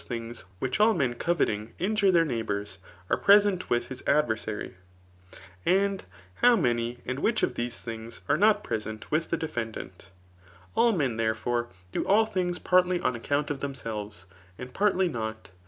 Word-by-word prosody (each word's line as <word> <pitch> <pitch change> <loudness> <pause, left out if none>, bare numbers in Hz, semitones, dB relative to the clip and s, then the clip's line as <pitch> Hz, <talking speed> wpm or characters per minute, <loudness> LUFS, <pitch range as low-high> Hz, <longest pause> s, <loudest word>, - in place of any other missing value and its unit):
things, 115 -3 -6
which 130 - -2
all 215 +1 +5
men 130 -7 +1
coveting 115 -7 -1
ivij^^re 200 +1 +2
their 170 -2 +4
neighbours, 105 -6 -3 0.3
are - - +1
present 200 -2 +4
with 120 0 0
his 130 -1 -7
adverjsaryi 110 -7 0 0.9
and 195 +1 +1 0.4
how 245 0 +7
many 120 - 0
and 130 +2 -3
which 220 +8 +1
of - - +1
these 120 0 -3
things 115 0 -8
are 145 - +3
not 210 +5 +4
present 110 -1 -5
with 155 +2 0
the^ 170 - 0
defeodaat. 115 - -5 0.7
All 235 - +4
men, 135 - 0
therefore, 115 +2 -1 0.2
do - - -1
all 215 +3 +5
things 180 -4 -1
partly 180 0 +3
oh - - +1
account 145 +5 -1
of 140 - -3
themselves, 110 -8 -5 0.3
and 125 0 -8
partly 190 -2 +2
not. 110 - -5
130 Hz, 155 wpm, -27 LUFS, 115-180 Hz, 0.9 s, how